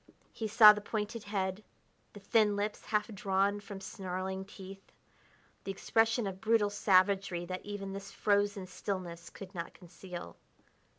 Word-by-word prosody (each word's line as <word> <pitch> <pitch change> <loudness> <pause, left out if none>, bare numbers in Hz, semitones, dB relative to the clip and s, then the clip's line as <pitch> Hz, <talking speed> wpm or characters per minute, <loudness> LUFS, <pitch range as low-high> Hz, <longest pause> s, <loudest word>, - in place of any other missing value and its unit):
He 220 - -4
saw 215 0 +9
the 210 - -5
pointed 215 +1 -4
head, 195 0 -2 0.5
the 205 - -10
thin 210 +1 +3
lips 205 +1 -3
half 210 -1 0
drawn 200 0 +1
from 200 -1 -8
snarling 190 0 -4
teeth, 195 -1 -12 0.7
the - - -7
expression 225 +4 +1
of 190 -1 -5
brutal 220 -2 +3
savagery 190 -2 +2
that 185 +1 -5
even 200 -1 -5
this 195 0 -7
frozen 205 -1 +1
stillness 180 -3 -5
could 195 -1 -11
not 170 -2 -6
conceal. 175 - -9
200 Hz, 140 wpm, -32 LUFS, 190-210 Hz, 0.7 s, saw